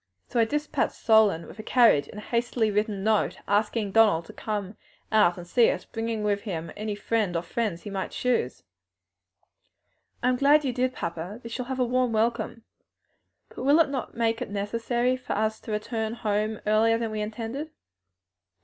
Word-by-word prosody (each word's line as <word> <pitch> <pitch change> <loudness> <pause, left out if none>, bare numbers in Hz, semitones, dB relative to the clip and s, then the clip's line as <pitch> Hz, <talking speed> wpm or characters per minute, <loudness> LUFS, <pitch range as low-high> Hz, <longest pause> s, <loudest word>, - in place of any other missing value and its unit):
So 240 - 0
I 230 - +5
dispatched 295 +2 -1
Solon 215 -7 +4
with - - -13
a - - -3
carriage 220 - +4
and - - -11
a 210 - -7
hastily 235 -1 0
written 210 -1 -1
note, 215 0 +1
asking 210 0 +1
Donald 205 -6 +4
to - - -12
come 205 -2 -4 0.4
out 210 -5 +4
to 175 - -9
see 230 +6 +4
us, - - -3
bringing 225 -1 -3
with 205 -1 0
him 170 -6 -5
any 210 0 -3
friend 205 -3 -1
or 170 - 0
friends 180 -2 -2
he 205 - -7
might 195 -1 -3
choose." 245 - -1 1.6
"I 250 - +4
am 250 - +1
glad 290 +3 +4
you 255 - 0
did, 255 +1 0
papa; 170 +6 -5
they 230 - -7
shall 245 +2 -4
have 260 +1 -4
a 250 - +3
warm 250 -1 +1
welcome. 230 0 -1 0.9
But - - -9
will 285 +5 +4
it 325 - +4
not 265 -4 -5
make 230 -1 +1
it - - -3
necessary 230 +5 0
for 255 - -5
us 220 +1 0
to - - -8
return 220 +1 -2
home 215 -1 -1
earlier 220 +2 +3
than 230 -1 -3
we 215 0 -3
intended?" 225 +8 -4
220 Hz, 185 wpm, -26 LUFS, 205-240 Hz, 1.6 s, I